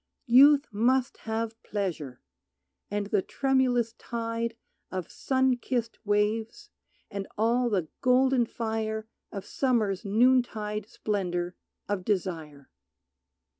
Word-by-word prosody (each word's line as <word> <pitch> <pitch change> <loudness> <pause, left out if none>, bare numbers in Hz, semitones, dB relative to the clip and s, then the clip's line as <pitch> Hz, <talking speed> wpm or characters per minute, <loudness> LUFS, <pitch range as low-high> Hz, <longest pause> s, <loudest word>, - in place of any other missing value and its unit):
Youth 280 +4 +7
must 250 +5 +1
have 225 0 -2
pleasure, 165 - -4 0.7
and 205 0 -1
the 205 -1 +1
tremulous 250 -2 +1
tide 230 0 -3 0.3
Of 185 -2 -5
sun 260 -1 +1
kissed 240 -1 -3
waves, 220 - 0 0.4
and 200 -1 -4
all 235 +3 +2
the 185 -7 0
golden 255 -1 +4
fire 220 -1 -3 0.2
Of 200 -2 -6
Summer's 220 -9 0
noontide 215 -2 +2
splendor 180 -4 -2 0.3
of 200 -3 -2
desire. 165 -8 -3
220 Hz, 100 wpm, -28 LUFS, 200-245 Hz, 0.7 s, Youth